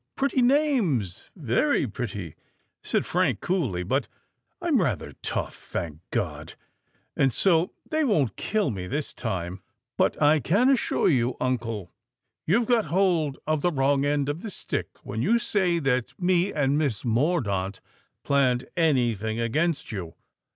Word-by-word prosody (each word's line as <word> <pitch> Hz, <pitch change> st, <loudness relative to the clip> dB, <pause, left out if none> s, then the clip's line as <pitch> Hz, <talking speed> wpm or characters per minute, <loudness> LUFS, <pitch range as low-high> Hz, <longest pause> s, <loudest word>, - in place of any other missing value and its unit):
"Pretty 275 Hz, -1 st, +1 dB
names—very 205 Hz, -, +1 dB
pretty," 105 Hz, -, -5 dB, 0.5 s
said -, -, 0 dB
Frank -, -, +1 dB
coolly; 130 Hz, -, -1 dB
"but 130 Hz, +10 st, 0 dB, 0.5 s
I'm 330 Hz, -, +2 dB
rather 120 Hz, -, -2 dB
tough, -, -, -3 dB
thank 80 Hz, -3 st, -5 dB
God! -, -, -3 dB, 0.6 s
and 135 Hz, -1 st, +3 dB
so 170 Hz, +3 st, +2 dB
they 315 Hz, 0 st, 0 dB
won't 150 Hz, -, +1 dB
kill 210 Hz, -8 st, 0 dB
me 95 Hz, -3 st, -5 dB
this 145 Hz, +8 st, -3 dB
time. 95 Hz, -4 st, -4 dB, 0.4 s
But -, -, +2 dB
I 150 Hz, +1 st, +5 dB
can 205 Hz, -, +3 dB
assure 265 Hz, -, +2 dB
you, 125 Hz, -5 st, +2 dB
uncle, 115 Hz, -7 st, -2 dB, 0.6 s
you've 215 Hz, +9 st, +3 dB
got 235 Hz, -2 st, +2 dB
hold 165 Hz, -4 st, +1 dB
of 155 Hz, -1 st, 0 dB
the 175 Hz, -, +2 dB
wrong 140 Hz, -2 st, +2 dB
end 145 Hz, -1 st, +1 dB
of 145 Hz, +4 st, -3 dB
the 220 Hz, -, -5 dB
stick -, -, -4 dB, 0.2 s
when 110 Hz, +2 st, -4 dB
you 230 Hz, -, +3 dB
say 190 Hz, -7 st, +1 dB
that 130 Hz, -6 st, -1 dB
me 180 Hz, +1 st, +2 dB
and 145 Hz, 0 st, +1 dB
Miss 135 Hz, -10 st, -1 dB
Mordaunt 110 Hz, -, 0 dB, 0.4 s
planned 130 Hz, -3 st, +2 dB
any 140 Hz, -9 st, +3 dB
thing 110 Hz, +2 st, -3 dB
against 150 Hz, +8 st, 0 dB
you. 90 Hz, -6 st, -6 dB
140 Hz, 145 wpm, -26 LUFS, 115-180 Hz, 0.6 s, I